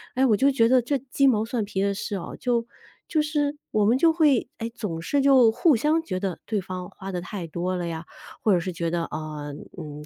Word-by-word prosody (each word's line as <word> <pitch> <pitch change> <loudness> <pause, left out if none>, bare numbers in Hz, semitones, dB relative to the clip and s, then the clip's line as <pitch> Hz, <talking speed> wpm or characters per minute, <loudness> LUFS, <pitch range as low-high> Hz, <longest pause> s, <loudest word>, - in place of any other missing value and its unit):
哎， 260 +1 +3
我 225 -5 +4
就 275 +4 +4
觉 235 -4 +3
得 255 0 +5
这 275 +4 0
鸡 275 +1 +1
毛 220 -4 +3
蒜 230 -1 -2
皮 195 -1 -2
的 200 0 +1
事 205 +1 -4
啊， 185 - -5
就 240 -2 0 0.4
就 310 - +1
是 295 -1 -1
我 215 - +2
们 230 +4 +4
就 325 +4 +4
会， 300 -8 +3
哎， 230 0 -3
总 180 -9 -4
是 280 +12 +1
就 265 -4 +6
互 300 +6 +3
相 300 +8 +2
觉 185 - -3
得 190 -3 -3
对 215 -3 -1
方 185 -1 -6
花 195 0 -8
得 180 - -2
太 180 -1 -6
多 175 +3 -2
了 175 -1 -2
呀， 165 0 -5 0.4
或 210 - +4
者 180 - +3
是 180 +2 -3
觉 170 -1 -2
得， 170 -1 0
呃， 150 -2 -6 0.2
嗯， 150 -2 -8
215 Hz, 255 characters per minute, -25 LUFS, 180-265 Hz, 0.4 s, 就